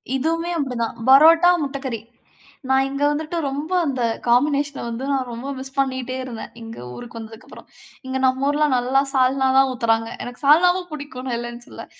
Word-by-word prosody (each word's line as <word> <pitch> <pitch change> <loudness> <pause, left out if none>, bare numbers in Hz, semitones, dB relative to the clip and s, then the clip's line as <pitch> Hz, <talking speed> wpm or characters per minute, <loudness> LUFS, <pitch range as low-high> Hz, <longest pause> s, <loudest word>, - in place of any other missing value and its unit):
இதுவுமே 330 +5 -1
அப்டிதான். 250 -5 -2
பரோட்டா, 325 +6 +7
முட்டக்கறி. 270 -4 -4 0.7
நான் 265 0 +3
இங்க 275 +1 -3
வந்துட்டு 310 +3 -3
ரொம்ப 290 +5 -4
அந்த 265 -4 -2 0.3
காம்பினேஷன 280 +3 +2
வந்து 235 +3 -5
நான் 260 -2 -1
ரொம்ப 235 +3 -7
மிஸ் 265 +1 -9
பண்ணிட்டே 260 -1 -1
இருந்தேன். 240 -3 -8
இங்க 225 0 -9 0.2
ஊருக்கு 240 -1 -9
வந்ததுக்கப்புறம். 225 0 -12 0.4
இங்க 260 0 -2
நம்ம 260 +1 +1
ஊர்ல 300 +1 +2
நல்லா 255 +2 +2
சால்னா 265 0 +2
தான் 270 0 +5
ஊத்தறாங்க. 225 -2 0
எனக்கு 245 +3 -9
சால்னாவும் 355 +5 +4
புடிக்கும். 285 -4 -7
நான் 240 -2 -1
இல்லன்னு 240 0 -7
சொல்லல. - - -10
265 Hz, 160 wpm, -21 LUFS, 245-290 Hz, 0.7 s, பரோட்டா